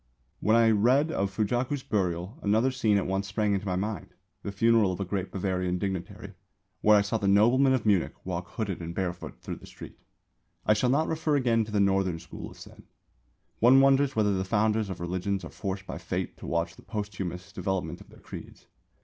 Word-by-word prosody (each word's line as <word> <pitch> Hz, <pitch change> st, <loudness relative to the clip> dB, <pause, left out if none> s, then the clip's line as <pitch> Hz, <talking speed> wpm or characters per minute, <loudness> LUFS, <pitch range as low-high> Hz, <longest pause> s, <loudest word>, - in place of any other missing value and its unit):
When 110 Hz, -, +3 dB
I 115 Hz, -1 st, +5 dB
read 125 Hz, +9 st, +3 dB
of 100 Hz, -7 st, 0 dB
Fujaku's 120 Hz, +7 st, -1 dB
burial 95 Hz, -, -2 dB
another 110 Hz, +6 st, +2 dB
scene 110 Hz, -6 st, +2 dB
at 100 Hz, -, 0 dB
once 95 Hz, +1 st, -1 dB
sprang 105 Hz, 0 st, 0 dB
into 100 Hz, +1 st, -2 dB
my 90 Hz, -, 0 dB
mind, 100 Hz, 0 st, -4 dB, 0.3 s
the 100 Hz, -, -5 dB
funeral 110 Hz, -1 st, +3 dB
of 90 Hz, -, -5 dB
a 100 Hz, -, -1 dB
great 95 Hz, 0 st, -3 dB
Bavarian 90 Hz, -2 st, -1 dB
dignitary, 95 Hz, -1 st, -5 dB, 0.5 s
where 105 Hz, 0 st, +6 dB
I -, -, +5 dB
saw 110 Hz, +3 st, -1 dB
the 100 Hz, -, -1 dB
noblemen 120 Hz, +7 st, +5 dB
of 130 Hz, -4 st, 0 dB
Munich 100 Hz, -5 st, +2 dB
walk 90 Hz, -1 st, -3 dB
hooded 100 Hz, -6 st, -3 dB
and 85 Hz, 0 st, -6 dB
barefoot 90 Hz, -2 st, -4 dB
through -, -, -5 dB
the -, -, -14 dB
streets. -, -, -12 dB, 0.6 s
I 105 Hz, -, +5 dB
shall 115 Hz, +4 st, +1 dB
not 150 Hz, +5 st, +2 dB
refer 160 Hz, -2 st, 0 dB
again 115 Hz, -5 st, +2 dB
to 105 Hz, -, -9 dB
the 105 Hz, -, +1 dB
Northern 95 Hz, -3 st, +2 dB
School 85 Hz, +1 st, -9 dB
of -, -, -15 dB
Zen. -, -, -13 dB, 0.8 s
One 125 Hz, +4 st, +7 dB
wonders 135 Hz, 0 st, +4 dB
whether 105 Hz, -2 st, +2 dB
the 95 Hz, -1 st, 0 dB
founders 110 Hz, +1 st, +1 dB
of 95 Hz, -, -5 dB
religions 90 Hz, +2 st, -2 dB
are -, -, -8 dB
forced 95 Hz, -1 st, -4 dB
by -, -, -6 dB
fate -, -, -3 dB
to -, -, -9 dB
watch 85 Hz, 0 st, -1 dB
the -, -, -13 dB
posthumous 100 Hz, -3 st, -5 dB
development 95 Hz, -2 st, -3 dB
of -, -, -15 dB
their -, -, -17 dB
creeds. -, -, -10 dB
100 Hz, 205 wpm, -28 LUFS, 95-115 Hz, 0.8 s, One